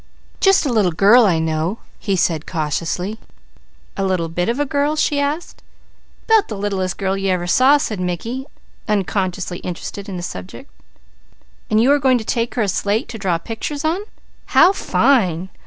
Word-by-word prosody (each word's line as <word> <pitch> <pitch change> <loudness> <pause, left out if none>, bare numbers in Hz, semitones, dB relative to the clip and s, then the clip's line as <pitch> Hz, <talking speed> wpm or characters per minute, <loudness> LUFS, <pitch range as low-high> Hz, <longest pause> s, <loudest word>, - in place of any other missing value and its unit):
"Just 390 -4 +4
a 265 - 0
little 205 -6 +3
girl 210 +7 +6
I 175 -4 +2
know," 160 +5 -1 0.2
he 200 -3 -1
said 165 -4 0
cautiously. 170 +6 -2 0.8
"A 195 - -2
little 185 -4 0
bit 175 +4 -1
of 240 +4 -1
a 290 - +1
girl?" 290 +1 0
she 300 -1 +1
asked. 290 +4 -3 0.6
"'Bout 445 -2 +4
the 215 - -6
littlest 195 -2 -2
girl 195 0 -1
you 195 0 -1
ever 180 -1 0
saw," 260 +10 +5
said 215 -8 -3
Mickey, 225 - -3 0.4
unconsciously 190 -3 -1
interested 195 +3 -6
in 185 - -5
the 175 - -6
subject. 90 - -8 1.0
"And 215 - +3
you 250 +5 +4
are 290 - +4
going 260 -2 +3
to 230 - -5
take 230 0 -1
her 240 - +1
a - - -1
slate 200 +3 -1
to 225 - -7
draw 185 -4 0
pictures 255 - -5
on? 335 +5 0 0.5
How 370 - +5
fine! 190 - +1
200 Hz, 175 wpm, -19 LUFS, 180-260 Hz, 1.0 s, girl